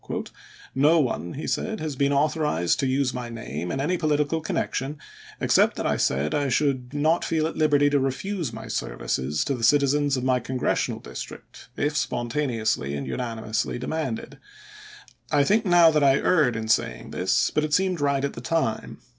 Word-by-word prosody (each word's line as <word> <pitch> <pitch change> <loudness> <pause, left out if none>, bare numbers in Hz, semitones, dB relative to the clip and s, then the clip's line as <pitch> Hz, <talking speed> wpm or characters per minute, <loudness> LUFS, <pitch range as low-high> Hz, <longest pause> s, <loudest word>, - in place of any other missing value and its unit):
"No 150 +5 +4
one," 105 - -1
he 150 - -5
said, 220 -1 -2
"has 155 -3 -4
been 140 +1 +1
authorized 145 - +1
to 135 - +1
use 130 0 +1
my 125 -1 -5
name, 90 -8 -5
in 135 - -2
any 170 +7 0
political 150 0 +1
connection, 145 -2 -2 0.4
except - - +3
that - - -4
I - - +1
said 70 +3 0
I 145 -1 0
should 130 -2 0
not 155 +4 +1
feel 160 -1 0
at 160 - -3
liberty 145 -2 +3
to 145 - +3
refuse 145 - -2
my 110 0 -8
services 65 - -2
to 140 - 0
the 120 -3 -5
citizens 145 +2 +3
of 125 - -3
my 130 -1 +2
congressional 130 +1 -1
district - - -10
if 150 +1 0
spon 120 -5 -2
taneously 110 - -1
and 70 - -4
unanimously 110 -2 -3
demanded. 160 - -4 0.9
I 145 -2 +4
think 215 +8 +2
now 175 -2 +6
that 150 -2 +2
I 135 -1 +5
erred 150 -10 +2
in 110 -1 -4
saying 60 - 0
this; - - +1
but 150 - +1
it 155 - -2
seemed 185 -4 0
right 140 -1 +1
at 140 - -3
the 115 - -8
time. 125 -6 -1
140 Hz, 180 wpm, -25 LUFS, 120-155 Hz, 0.9 s, now